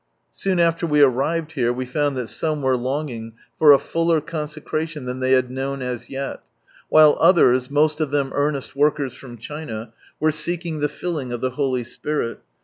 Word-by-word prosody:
Soon 190 Hz, -2 st, -1 dB
after 170 Hz, 0 st, +2 dB
we 150 Hz, -1 st, +3 dB
arrived 145 Hz, +5 st, +2 dB
here 125 Hz, -6 st, 0 dB
we 130 Hz, +1 st, -3 dB
found 145 Hz, +1 st, -1 dB
that 125 Hz, -, -2 dB
some 155 Hz, +4 st, -2 dB
were 130 Hz, -1 st, +3 dB
longing 125 Hz, -3 st, -4 dB, 0.3 s
for 150 Hz, -2 st, +8 dB
a 140 Hz, -, +8 dB
fuller 165 Hz, +2 st, +1 dB
con 150 Hz, 0 st, -4 dB
secration 155 Hz, -1 st, -4 dB
than 125 Hz, +1 st, -4 dB
they 130 Hz, 0 st, +2 dB
had 130 Hz, -1 st, +2 dB
known 135 Hz, +1 st, -3 dB
as 125 Hz, -2 st, -5 dB
yet, 135 Hz, 0 st, -5 dB, 0.5 s
while 155 Hz, -1 st, +7 dB
others, 130 Hz, -8 st, +4 dB
most 150 Hz, +2 st, +2 dB
of 155 Hz, -, 0 dB
them 140 Hz, -1 st, 0 dB
earnest 145 Hz, -2 st, -1 dB
workers 145 Hz, -2 st, +1 dB
from 120 Hz, -3 st, -11 dB
China, 115 Hz, -4 st, -7 dB, 0.3 s
were 155 Hz, 0 st, +3 dB
seeking 165 Hz, +1 st, -2 dB
the 150 Hz, 0 st, 0 dB
filling 150 Hz, -4 st, -4 dB
of 120 Hz, -, -3 dB
the 130 Hz, +1 st, -1 dB
Holy 130 Hz, -2 st, -1 dB
Spirit. 120 Hz, +1 st, -3 dB
145 Hz, 185 wpm, -22 LUFS, 130-155 Hz, 0.5 s, for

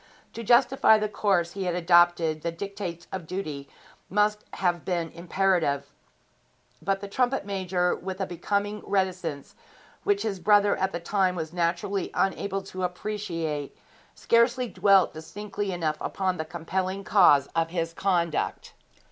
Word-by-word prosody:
To 230 Hz, -, -6 dB
justify 240 Hz, 0 st, +5 dB
the 215 Hz, 0 st, -1 dB
course 195 Hz, -5 st, +1 dB
he 195 Hz, +1 st, -4 dB
had 175 Hz, -1 st, -1 dB
adopted 175 Hz, -2 st, +3 dB
the 170 Hz, -, -2 dB
dictates 185 Hz, -1 st, -6 dB
of 180 Hz, -4 st, -5 dB
duty 155 Hz, -7 st, -5 dB, 0.4 s
must 210 Hz, +2 st, +1 dB
have 175 Hz, -3 st, 0 dB
been 170 Hz, -3 st, -2 dB
imperative; 170 Hz, -5 st, 0 dB, 0.9 s
but 195 Hz, +3 st, -1 dB
the 200 Hz, -, -5 dB
trumpet 250 Hz, +3 st, 0 dB
major, 185 Hz, -2 st, 0 dB
with 190 Hz, +1 st, -6 dB
a 195 Hz, -, 0 dB
becoming 200 Hz, +4 st, -2 dB
reticence 185 Hz, -7 st, -2 dB, 0.5 s
which 205 Hz, 0 st, +1 dB
his 205 Hz, -4 st, -2 dB
brother 205 Hz, +2 st, +4 dB
at 190 Hz, 0 st, -1 dB
the 170 Hz, -, -3 dB
time 185 Hz, +1 st, +1 dB
was 160 Hz, -1 st, -5 dB
naturally 175 Hz, +3 st, -1 dB
unable 195 Hz, 0 st, 0 dB
to 185 Hz, -1 st, -7 dB
appreciate, 175 Hz, -6 st, -3 dB, 0.4 s
scarcely 235 Hz, +2 st, +2 dB
dwelt 195 Hz, -3 st, +4 dB
distinctly 200 Hz, +5 st, -5 dB
enough 160 Hz, -4 st, -1 dB
upon 185 Hz, -2 st, -1 dB
the 160 Hz, -, -3 dB
compelling 185 Hz, +4 st, -3 dB
cause 175 Hz, -9 st, +5 dB
of 165 Hz, 0 st, +1 dB
his 165 Hz, -1 st, -2 dB
conduct. 170 Hz, -4 st, -1 dB
185 Hz, 140 wpm, -26 LUFS, 170-200 Hz, 0.9 s, justify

